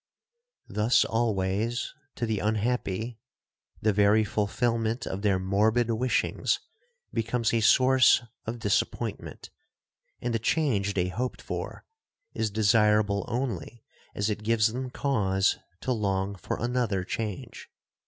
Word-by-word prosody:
'Thus 105 +4 +3
always, 110 0 -1 0.2
to 120 - -2
the 110 -3 -1
unhappy, 110 0 -1 0.6
the 110 -1 +3
very 105 +2 +4
fulfilment 115 +2 -1
of 95 - -4
their 100 -2 +2
morbid 110 +5 +2
wishings 125 +3 0 0.5
becomes 115 0 0
a 115 - +2
source 130 +2 +5 0.2
of 115 +2 -3
disappointment, 105 -3 -2 0.7
and 120 -1 -2
the 115 - +1
change 110 -6 +1
they 90 -1 +1
hoped 125 +7 -3
for - - -6 0.5
is 110 - -1
desirable 105 -1 +3
only 120 -1 -4 0.3
as 100 - 0
it 105 -1 -2
gives 110 0 +2
them 130 +1 -4
cause 100 -9 +1 0.2
to 130 - -2
long 100 -3 0
for 95 - -4
another 120 -6 0
change. 105 0 -5
110 Hz, 120 wpm, -27 LUFS, 100-120 Hz, 0.7 s, source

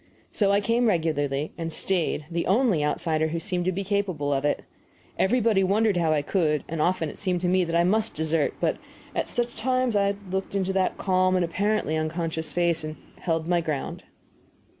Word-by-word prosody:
So 200 -2 +2
I 200 +1 +3
came 230 +3 +2
regularly, 150 -6 0
and 165 0 -3
stayed 170 -3 0
the 170 0 -1
only 205 - +3
outsider 155 +1 0
who 160 +1 -3
seemed 180 0 -2
to 185 - +2
be 195 +2 -3
capable 185 -8 -1
of 135 0 0
it. 145 - 0 0.6
Everybody 220 -2 +3
wondered 205 +2 +2
how 165 -2 +2
I 150 -2 +1
could; 155 -3 +1
and 160 -1 -3
often 175 -1 +1
it - - -9
seemed 185 -3 0
to 180 - 0
me 185 +1 +3
that 165 0 -2
I 170 - +4
must 215 +5 +1
desert, 160 -1 0
but - - +1 0.4
at - - -1
such 240 0 -1
times 255 -3 +1
I 200 0 +2 0.2
looked 190 +1 -3
into 190 -1 0
that 190 -1 +1
calm 185 -1 +2
and 180 -1 +2
apparently 200 -1 0
unconscious 160 0 -2
face, 170 -1 +1
and 155 0 -5 0.2
held 165 -2 -1
my 175 -1 +2
ground. 155 -4 -4
175 Hz, 195 wpm, -26 LUFS, 160-200 Hz, 0.6 s, I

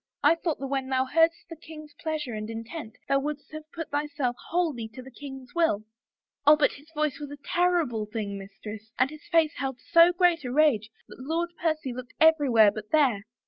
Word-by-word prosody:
I 295 - +7
thought 335 -2 -2
that 275 - -5
when 270 -1 -2
thou 260 0 +2
heardest 330 +4 +2
the. 330 - -8
king's 310 -2 -12
pleasure 300 -5 -4
and 215 0 -5
intent 225 +2 -7
thou 275 - +3
wouldest 295 +2 -5
have 310 0 -9
put 330 -1 -6
thyself 290 -4 -1
wholly 315 -10 0
to 255 - -7
the 265 - -12
king's 265 -1 -10
will.' 325 -12 +2 0.6
Oh, 300 +1 +8
but 300 - +3
his 290 +2 -14
voice 305 -1 0
was 290 -1 -6
a 290 - -8
ter 355 +5 +1 0.2
rible 220 -4 -5
thing, 210 -3 -3
mistress, 210 +2 -9
and 255 +3 +2
his 305 -1 -12
face 325 -2 +4
held 270 -2 -3
so 335 0 +8
great 350 -3 +2
a 250 - -4
rage 255 -7 +3 0.2
that - - -13
Lord 330 +6 -2
Percy 310 -7 -1
looked 250 0 -9
ever)rwhere 275 -10 +5
but 215 0 -8
there. 255 -10 +2
290 Hz, 205 wpm, -27 LUFS, 245-315 Hz, 0.6 s, Oh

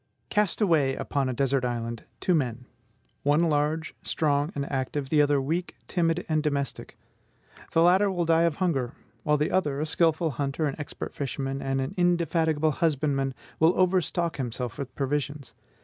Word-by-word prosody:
Cast 210 -1 +1
away 155 -9 +3
upon 140 -2 -1
a - - -1
desert 135 +1 +1
island 115 -2 -3
two 180 - +1
men: 125 -6 -1 0.6
one 145 +4 +3
large, 150 +2 0
strong, 145 0 0
and 140 -1 -2
active; 135 +1 -2
the 150 0 +4
other 145 -1 +3
weak, 165 +6 -2
timid, 170 -1 0
and 155 -1 +1
domestic. 140 -2 -3 0.8
The 165 - +5
latter 190 +4 +5
will 175 -3 0
die 165 0 +4
of 170 -3 +2
hunger; 145 -9 -1 0.3
while 150 -1 +2
the 150 +1 0
other, 145 -7 +1
a 155 - 0
skilful 160 0 +2
hunter, 140 +4 -2
an 145 - -1
expert 145 - -6
fisherman, 135 0 -3
and 135 0 -1
an 135 0 -2
indefatigable 165 -3 +2
husbandman, 140 -3 0 0.2
will 160 +2 +4
overstock 180 -2 +1
himself 125 -2 -4
with 135 -2 -6
provisions. 140 -2 -2
150 Hz, 165 wpm, -27 LUFS, 135-165 Hz, 0.8 s, The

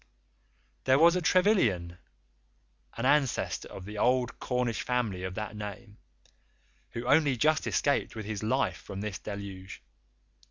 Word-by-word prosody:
There 130 0 +5
was 170 +3 +6
a 180 - +1
Trevilian, 125 - +2 1.0
an 115 - -2
ancestor 140 -2 +1
of 95 - -9
the 105 +1 -6
old 125 +1 +1
Cornish 125 -2 -1
family 115 -7 -1
of 95 0 -4
that 105 0 -5
name, 105 +1 -8 0.9
who 115 +1 -5
only 145 -1 +4
just 155 +5 +2
escaped 140 -4 0
with 110 -2 -6
his 105 -1 -4
life 110 +1 0
from 100 0 -8
this 105 -3 -4
deluge. 100 -2 -8
115 Hz, 135 wpm, -29 LUFS, 100-135 Hz, 1.0 s, was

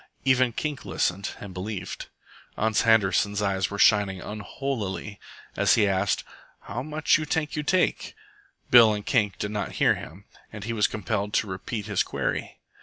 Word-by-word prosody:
Even 130 -2 +4
Kink 145 +3 -4
listened 95 +3 -1
and 100 -2 -9
believed. 95 +1 -5 0.5
Ans 110 0 +2
Handerson's 105 -2 +3
eyes 95 -3 0
were 100 - -5
shining 100 -2 +4
unholily 105 -1 -5 0.4
as - - +4
he 105 -2 +3
asked, 95 +1 +1 0.4
"How - - -5
much 155 +2 +1
you 155 - -3
tank 150 0 -1
you 150 - -1
take?" 180 +4 0 0.6
Bill 115 -3 +8
and 105 - -6
Kink 105 -7 +1
did 105 - -3
not 105 -1 -3
hear - - +3
him, 95 +6 -10 0.3
and 105 -2 -8
he 115 +2 -3
was 105 -2 +3
compelled 105 -1 -3
to 110 - +2
repeat 100 +3 -5
his - - 0
query. - - -3
105 Hz, 165 wpm, -26 LUFS, 100-120 Hz, 0.6 s, Bill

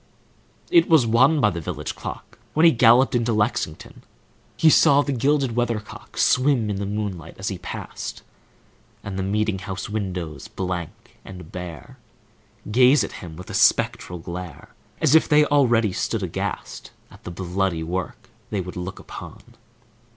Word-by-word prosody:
It 345 -2 +5
was 160 -7 +5
one 130 +7 +4
by 105 -6 +3
the 85 -1 -5
village - - -5
clock, - - -8 0.2
When 160 +2 +5
he 165 - +8
galloped 120 +2 +5
into 120 -1 +1
Lexington. 105 -7 -2 0.6
He 160 - +5
saw 145 0 +5
the 145 - -3
gilded 135 -1 +1
weathercock 120 -3 -4
Swim 130 -5 +2
in 100 - -3
the 100 0 -3
moonlight 100 -6 -4
as 95 - -3
he 95 -3 -5
passed, - - -7 0.8
And 100 -2 -6
the 95 - -2
meeting 105 +1 0
house 95 +1 -6
windows, 95 -7 -4
blank 90 -3 -6
and 90 -4 -11
bare, 90 -5 -8 0.7
Gaze 130 +5 +5
at - - -5
him 85 -3 -9
with 90 +3 -10
a - - -7
spectral 90 - +2
glare, 85 -1 -8 0.3
As 155 -3 +3
if 160 - +5
they 150 0 +5
already 120 -9 +3
stood - - -2
aghast - - -5 0.2
At - - -17
the - - -6
bloody 90 -1 -2
work 90 +3 -5 0.2
they 105 - -2
would 90 0 -6
look 90 +1 -5
upon. - - -10
105 Hz, 160 wpm, -23 LUFS, 90-125 Hz, 0.8 s, he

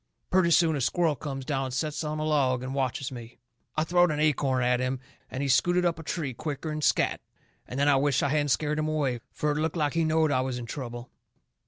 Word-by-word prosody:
Purty 185 -2 +4
soon 165 -1 +4
a 140 - -2
squirrel 165 +3 +1
comes 135 -2 -6
down 135 -1 -1
and 130 - -5
sets 150 +3 -2
on 155 0 -3
a 155 - -2
log 135 -5 +1
and 130 +1 -4
watches 135 0 -2
me. 120 -2 -9 0.4
I 155 - +3
throwed 175 +2 +3
an 150 -1 -1
acorn 140 -4 +2
at 125 0 +2
him, 130 0 -1 0.3
and 130 +2 -3
he - - 0
scooted 175 +7 +3
up 170 -2 0
a - - -7
tree 150 -4 -3
quicker'n 155 +3 -4
scatt. - - +2 0.5
And 130 - -5
then 140 - +3
I 140 -2 +5
wisht 140 -1 +2
I - - +1
hadn't 145 0 +1
scared 150 +2 0
him 155 - 0
away, 145 -6 0
fur 150 - -1
it 145 - -1
looked 160 +2 -1
like 150 -2 0
he 165 0 +1
knowed 160 -1 +2
I 130 - +2
was 130 -1 -2
in 120 - -5
trouble. 120 -1 -7
145 Hz, 240 wpm, -27 LUFS, 130-155 Hz, 0.5 s, I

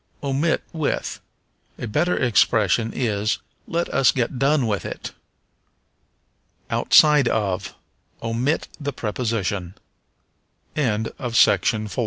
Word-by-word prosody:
Omit 140 +4 0
with. 160 -3 -2 0.6
A - - -5
better 155 +11 0
expression 115 -2 +2
is, 110 -3 -1 0.3
Let 170 +1 -1
us 135 -3 +4
get 125 0 -2
done 140 0 +2
with 105 -5 -1
it. - - -6 1.6
Outside 150 -4 +5
of. 100 -4 -1 0.5
Omit 120 +7 -1
the 145 -2 -3
preposition. 105 -6 -3 1.0
Pair 110 -7 0
for 110 -4 +2
120 Hz, 95 wpm, -22 LUFS, 105-140 Hz, 1.6 s, Outside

